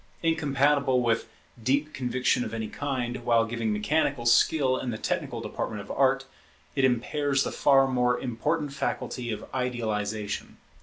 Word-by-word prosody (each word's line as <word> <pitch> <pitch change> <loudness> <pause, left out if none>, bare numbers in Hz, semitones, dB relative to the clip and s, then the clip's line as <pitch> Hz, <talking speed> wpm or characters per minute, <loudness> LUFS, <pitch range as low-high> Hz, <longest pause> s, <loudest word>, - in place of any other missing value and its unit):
Incompatible 140 -4 +2
with 115 -1 +1 0.3
deep 140 +6 +1
conviction 125 -1 0
of - - -5
any 110 -1 -3
kind, 130 -4 -3
while 115 -1 +3
giving 115 -1 -2
mechanical 125 +4 0
skill 130 +2 +4
in 130 - -3
the 110 - -3
technical - - -2
department 105 - -4
of 100 - -8
Art, 135 0 +2 0.5
it 135 - +1
impairs 135 +3 +1
the - - -3
far 135 -1 +4
more 125 -1 +1
important 140 +5 -2
faculty 125 -3 -3
of 105 - -5
idealization. 110 -5 -2
125 Hz, 145 wpm, -27 LUFS, 115-140 Hz, 0.5 s, skill